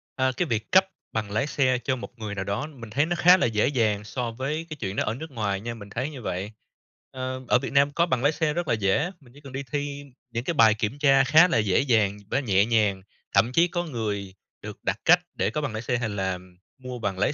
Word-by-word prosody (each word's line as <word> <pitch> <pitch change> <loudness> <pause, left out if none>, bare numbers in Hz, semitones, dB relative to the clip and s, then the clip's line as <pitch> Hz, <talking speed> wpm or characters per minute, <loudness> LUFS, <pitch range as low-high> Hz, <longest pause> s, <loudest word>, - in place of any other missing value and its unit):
à, 130 0 +1
cái 180 - +1
việc 115 - -3
cấp 190 0 +6 0.3
bằng 105 -2 -3
lái 120 +7 0
xe 130 -4 +2
cho 130 - 0
một 125 -1 -10
người 105 -2 -5
nào 95 - -2
đó 100 +9 -3
mình 125 -7 -11
thấy 140 +8 +1
nó 175 +2 -1
khá 180 +2 +7
là - - +1
dễ 110 -2 +1
dàng 110 -7 +1
so 120 +2 -4
với 140 +7 -3
cái 155 - -6
chuyện 100 -4 -3
đó - - +1
ở 105 - -1
nước 160 +4 -8
ngoài 100 -5 -2
nha, 120 +2 -4
mình 105 -3 -11
thấy 130 +7 -3
như 140 -5 -9
vậy. 100 0 -4 0.6
Ơ, 130 0 -4
ở 125 - +4
Việt - - -5
Nam 140 0 +4
có 170 +4 +2
bằng 130 -7 -1
lái 145 - +4
xe 155 -1 0
rất 175 +1 -2
là - - +2
dễ, 110 - +1
mình 125 -5 -20
chỉ 145 - -16
cần 135 -3 -11
đi 135 +1 -4
thi 145 -1 -3 0.3
những 115 0 -3
cái 170 - -1
bài 115 -7 +6
kiểm 110 +4 -3
tra 135 -2 +5
khá 155 +7 +6
là 175 - +1
dễ 105 -4 +2
dàng 110 -7 +2
với 135 - +1
nhẹ 100 -6 +3
nhàng, 105 -4 +1 0.3
thậm 105 +5 +4
chí 165 +6 +4
có 175 0 -2
người 105 - -4 0.3
được 105 0 -8
đặc 100 +1 0
cách 175 +2 +7 0.2
để - - 0
có 150 - -3
bằng 145 -7 -3
lái 110 - -3
xe 125 0 -1
hay 120 -2 -2
là 95 -2 -2 0.4
mua 125 -2 -7
bằng 95 -3 -3
lái 125 - +2
125 Hz, 265 wpm, -25 LUFS, 105-145 Hz, 0.6 s, khá